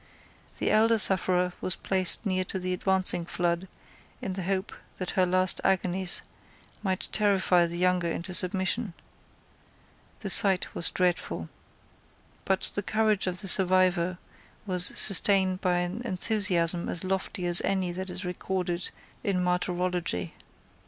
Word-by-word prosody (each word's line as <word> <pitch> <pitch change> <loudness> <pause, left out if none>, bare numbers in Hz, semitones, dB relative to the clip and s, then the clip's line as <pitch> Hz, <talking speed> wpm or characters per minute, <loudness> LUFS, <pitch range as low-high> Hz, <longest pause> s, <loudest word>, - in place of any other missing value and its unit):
The - - -1
elder 225 +1 +3
sufferer 180 -3 0
was 185 - -1
placed 185 +2 +3
near 185 -2 -1
to 190 - -5
the 185 0 -4
advancing 185 -1 +3
flood, 170 +1 -3 0.5
in 190 - -6
the 190 - -6
hope 190 +2 -3 0.2
that 185 - -5
her 185 -1 0
last 185 0 0
agonies 185 -1 0 0.6
might 190 -3 -3
terrify 190 -4 +1
the 170 +1 -7
younger 180 -1 0
into 170 +2 -6
submission. 190 +2 -2 1.3
The 195 - -3
sight 190 -1 +3
was 170 - +4
dreadful. 175 - -3 1.0
But 190 -1 -1
the 205 - -1
courage 215 -1 0
of 180 +1 -4
the 195 - -7
survivor 185 -1 +2 0.5
was 180 -2 +7
sustained 190 -1 +5
by 180 -1 0
an 175 +5 -4
enthusiasm 185 -5 -1
as 175 - -3
lofty 190 0 -4
as 175 0 +5
any 190 -2 -2
that 185 +2 -7
is 180 +1 -5
recorded 180 -1 -4 0.3
in 195 -5 -1
martyrology. 180 - -3
185 Hz, 135 wpm, -26 LUFS, 180-190 Hz, 1.3 s, was